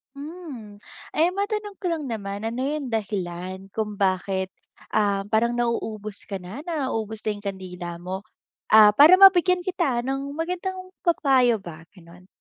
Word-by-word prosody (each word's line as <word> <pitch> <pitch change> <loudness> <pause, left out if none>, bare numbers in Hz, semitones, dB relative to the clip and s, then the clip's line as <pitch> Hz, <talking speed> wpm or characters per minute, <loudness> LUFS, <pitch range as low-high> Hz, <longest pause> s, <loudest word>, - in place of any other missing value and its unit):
Hmm, 280 - -9 0.3
eh 330 +3 +3
matanong 410 +1 -3
ko 370 - -5
lang 315 -7 -2
naman, 200 -2 -4
ano 230 +2 -3
yung 290 -3 -3
dahilan, 190 -3 -4
kung 210 0 -3
bakit 190 -1 0 0.4
ah 200 -2 +1
parang 235 +2 +2
nauubos 220 -3 -3
ka 200 - -6
na, 185 +8 -8
naubos 225 -9 -3
na 215 - -1
yung 205 0 -6
kandila 180 -3 -5
mo 190 +3 -5 0.5
ah 215 -1 +9
para 290 - +8
mabigyan 370 -1 +6
kita 345 -10 0
ng 270 +2 -3
magandang 365 +3 -4 0.2
pa-payo 260 - +3
ba 160 -3 -10
ganon? 180 0 -16
225 Hz, 145 wpm, -24 LUFS, 200-315 Hz, 0.5 s, ah